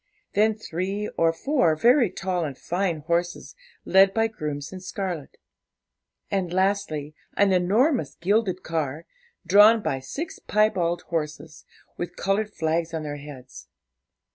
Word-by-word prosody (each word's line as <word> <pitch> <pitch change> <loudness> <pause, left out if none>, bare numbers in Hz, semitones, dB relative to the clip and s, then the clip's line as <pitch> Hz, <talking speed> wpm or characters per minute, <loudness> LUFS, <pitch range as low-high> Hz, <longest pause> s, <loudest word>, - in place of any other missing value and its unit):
Then, 215 +1 +3
three 200 +1 -3
or 165 0 +2
four 175 - +1
very 240 - +4
tall 180 -1 -2
and 140 -4 -5
fine 175 -3 -2
horses, 170 +3 -2 0.3
led 195 +1 +5
by 225 0 +3
grooms 150 -6 -5
in 185 - -6
scarlet. 185 -5 -5 0.9
And 190 -3 -1
lastly, 180 -6 0 0.2
an 200 -1 +4
enormous 220 - +2
gilded 190 -1 0
car, 160 -1 -3 0.4
drawn 210 +3 +6
by 135 - -1
six 280 - -6
piebald 185 -5 +1
horses, 155 -2 -4 0.3
with 175 0 -5
coloured 205 +2 0
flags 165 -1 -1
on 160 - -3
their 145 -1 -5
heads. 130 - -11
180 Hz, 130 wpm, -25 LUFS, 155-205 Hz, 0.9 s, drawn